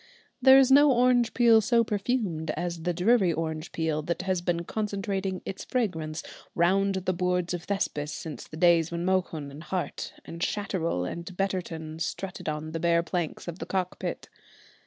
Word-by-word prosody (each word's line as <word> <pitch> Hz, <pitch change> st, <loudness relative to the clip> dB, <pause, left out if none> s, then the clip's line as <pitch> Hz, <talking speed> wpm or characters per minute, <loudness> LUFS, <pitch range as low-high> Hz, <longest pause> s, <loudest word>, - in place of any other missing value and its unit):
There 265 Hz, +1 st, +8 dB
is 270 Hz, -1 st, +5 dB
no 285 Hz, +1 st, +7 dB
orange 245 Hz, -1 st, +3 dB
peel 230 Hz, -2 st, +6 dB
so 235 Hz, +2 st, +3 dB
perfumed 205 Hz, -7 st, -1 dB
as 175 Hz, 0 st, -3 dB
the 175 Hz, +2 st, 0 dB
Drury 190 Hz, +2 st, +3 dB
orange 160 Hz, 0 st, -3 dB
peel 160 Hz, -2 st, -1 dB
that 170 Hz, +4 st, -3 dB
has 185 Hz, -2 st, 0 dB
been 175 Hz, -1 st, -1 dB
concentrating 195 Hz, -2 st, -3 dB
its 195 Hz, -, -5 dB
fragrance 160 Hz, -11 st, -2 dB, 0.3 s
round 195 Hz, +3 st, +3 dB
the 185 Hz, 0 st, -1 dB
boards 180 Hz, 0 st, 0 dB
of 175 Hz, -1 st, -4 dB
Thespis 150 Hz, -7 st, -2 dB
since 155 Hz, -1 st, -7 dB
the 155 Hz, -, -10 dB
days 170 Hz, -1 st, +4 dB
when 170 Hz, +1 st, -3 dB
Mohun 180 Hz, -6 st, -1 dB
and 145 Hz, +2 st, -10 dB
Hart, 175 Hz, +3 st, -4 dB
and 165 Hz, 0 st, -8 dB
Shatterel 175 Hz, -, -1 dB
and 170 Hz, -, -6 dB
Betterton 165 Hz, -5 st, -3 dB
strutted 185 Hz, 0 st, -4 dB
on 155 Hz, +1 st, -4 dB
the 165 Hz, -, -3 dB
bare 170 Hz, 0 st, +3 dB
planks 170 Hz, -1 st, -3 dB
of 170 Hz, +1 st, -6 dB
the -, -, -6 dB
Cockpit. 185 Hz, -1 st, -3 dB
180 Hz, 170 wpm, -27 LUFS, 165-195 Hz, 0.3 s, There